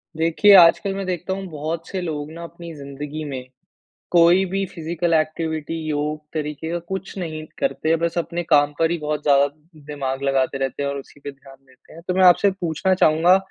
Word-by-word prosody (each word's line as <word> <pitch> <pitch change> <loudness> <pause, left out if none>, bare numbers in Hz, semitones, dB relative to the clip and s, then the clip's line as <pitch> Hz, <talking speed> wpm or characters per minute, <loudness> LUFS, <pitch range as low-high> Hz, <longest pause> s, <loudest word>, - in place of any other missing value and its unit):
देखिए 165 +6 +4
आजकल 175 +3 +5
मैं 195 0 -4
देखता 185 0 -3
हूँ 195 0 -5
बहुत 160 +2 -4
से 190 - -4
लोग 155 -3 -4
ना 170 +1 -9
अपनी 170 0 -9
ज़िंदगी 145 +2 -7
में 130 -2 -5 0.7
कोई 175 +2 +5
भी 195 +1 -1
फ़िज़िकल 170 0 -2
एक्टिविटी, 160 0 -1
योग 150 0 -2
तरीक़े 150 0 -4
का 175 - -1
कुछ 190 +4 -6
नहीं 155 -3 -5
करते। 165 -12 0
बस 170 +1 -1
अपने 170 0 -2
काम 145 -3 +3
पर 165 0 +2
ही 170 - -1
बहुत 150 -1 -3
ज़्यादा 140 -1 +4 0.4
दिमाग 135 -2 -4
लगाते 135 -1 0
रहते 135 +1 -2
हैं 140 - -1
और 140 - -4
उसी 140 +1 -13
पे 145 - -6
ध्यान 135 -1 -16
देते 130 - -22
हैं। 165 - -12
तो 180 - +1
मैं 190 - +3
आपसे 185 +3 +6
पूछना 185 0 -1
चाहूँगा 170 +1 +4
160 Hz, 195 wpm, -22 LUFS, 145-175 Hz, 0.7 s, आपसे